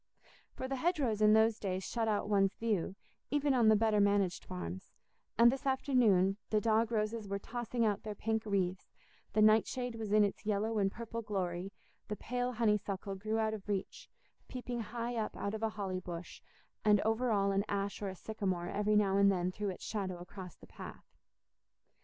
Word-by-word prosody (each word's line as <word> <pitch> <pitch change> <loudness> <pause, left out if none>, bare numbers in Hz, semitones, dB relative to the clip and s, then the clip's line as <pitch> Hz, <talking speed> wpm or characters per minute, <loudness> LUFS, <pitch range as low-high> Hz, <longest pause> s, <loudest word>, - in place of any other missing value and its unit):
For 260 - -4
the 270 0 -2
hedgerows 260 - 0
in 215 0 +6
those 220 0 +4
days 190 -1 -2
shut 225 +3 -1
out 210 -2 0
one's 200 -1 +2
view, 205 -5 -1 0.3
even 290 -1 +2
on 240 -4 +4
the 220 - +7
better 215 0 +3
managed 200 -3 +2
farms; 90 +1 -7 0.4
and 235 +1 +7
this 270 - -4
afternoon, 230 -8 +3
the 215 - +3
dog 225 +1 +2
roses 215 -1 -1
were 200 0 -2
tossing 235 +2 -2
out 205 -1 +1
their 215 -1 -6
pink 220 +1 -1
wreaths, 190 -2 -1 0.4
the 215 - +4
nightshade 225 +3 +3
was 220 -2 -5
in 210 0 +6
its 200 - -1
yellow 215 +1 0
and 195 -1 +2
purple 230 +1 -5
glory, 190 -3 -3 0.4
the 210 - -3
pale 245 +3 -2
honeysuckle 210 -4 0
grew 215 +3 -2
out 220 -1 +1
of 210 -1 -7
reach, 195 -2 -3 0.4
peeping 245 -1 -5
high 235 +3 -4
up 220 - -3
out 200 - -3
of 220 - -4
a 225 - +1
holly 195 -3 -3
bush, 175 -1 -8 0.4
and 210 -1 +5
over 225 +3 +1
all 200 -2 +2
an 195 0 +1
ash 200 0 -2
or 200 - -2
a 190 - -7
sycamore 190 -4 -3
every 210 +1 +1
now 200 -2 +3
and 200 0 +6
then 180 -1 0
threw 205 +2 -3
its 185 - -7
shadow 190 -4 -3
across 180 0 -9
the - - -16
path. - - -10
210 Hz, 190 wpm, -33 LUFS, 195-225 Hz, 0.4 s, the